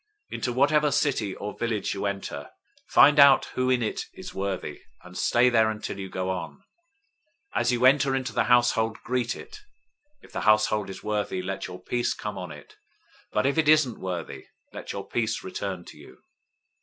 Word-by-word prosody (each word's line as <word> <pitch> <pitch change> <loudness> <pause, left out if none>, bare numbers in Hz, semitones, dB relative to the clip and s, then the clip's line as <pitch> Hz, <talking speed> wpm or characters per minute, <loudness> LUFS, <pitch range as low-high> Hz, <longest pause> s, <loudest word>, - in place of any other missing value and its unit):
010:011 - - -4
Into 120 - -2
whatever 145 +3 +3
city 135 -9 0
or 105 +1 -6
village 115 -3 -1
you 100 0 -2
enter, 95 -7 -5 0.4
find 150 +1 +6
out 140 -1 +7
who 130 0 0
in 125 -2 +2
it 110 - -3
is - - -9
worthy; 95 -1 -4 0.2
and 90 0 -13
stay 120 +5 +3
there 110 -3 +4
until 105 -2 -5
you 95 -1 -6
go 95 0 -2
on. 95 - -4
010:012 - - -26 1.0
As - - +2
you 125 +1 +1
enter 135 0 +4
into 130 0 -3
the - - +1
household, 120 -2 +3
greet 125 -1 -1
it. 430 -1 -11 0.6
010:013 - - -35
If - - -17
the - - -4
household 105 -1 +3
is 95 - -9
worthy, 105 -3 -2
let 95 +1 -4
your 90 0 -9
peace 120 +6 -1
come 105 -2 -5
on 90 -3 -7
it, 75 -1 -13 0.5
but 105 - 0
if 140 +4 +1
it 155 -2 +3
isn't 155 -7 +4
worthy, 90 -3 -5 0.3
let - - -7
your - - -6
peace 110 -2 -1
return 95 -1 -5
to - - -13
you. - - -15
110 Hz, 195 wpm, -26 LUFS, 95-130 Hz, 1.0 s, out